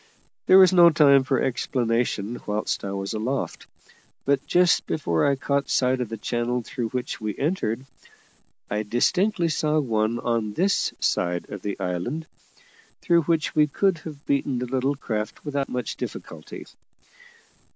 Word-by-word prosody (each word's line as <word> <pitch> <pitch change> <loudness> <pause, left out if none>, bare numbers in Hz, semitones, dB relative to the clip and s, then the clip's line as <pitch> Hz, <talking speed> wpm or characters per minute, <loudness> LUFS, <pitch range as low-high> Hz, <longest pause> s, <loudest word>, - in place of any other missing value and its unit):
There 185 - +8
was 185 -1 +7
no 175 -2 +8
time 140 -4 +5
for 130 -1 0
explanation 120 -3 -1
whilst 105 +1 -2
I 100 - -3
was 100 +2 -4
aloft; 120 +6 -3 0.6
but, 140 -1 +2
just 180 -1 +3
before 85 - 0
I 140 - +3
caught 140 0 -1
sight 130 0 +2
of 120 - -3
the 115 - -5
channel 120 +2 -2
through 115 0 -4
which 125 -1 -4
we 105 -2 -3
entered, 135 - -1 0.8
I 105 +1 -1
distinctly 170 - +1
saw 155 -1 +1
one 115 -4 0
on 115 -3 -1
this 190 - +1
side 90 0 -1
of 100 - -6
the 100 -1 -4
island, 95 - -3 0.8
through 170 -1 +4
which 165 -2 0
we 150 -1 +4
could 185 +3 +1
have 150 -2 -10
beaten 140 -2 0
the 125 - -2
little 130 +3 0
craft 110 -3 -4
without 140 -2 -2
much 125 0 -4
difficulty. - - -8
130 Hz, 150 wpm, -24 LUFS, 110-150 Hz, 0.8 s, There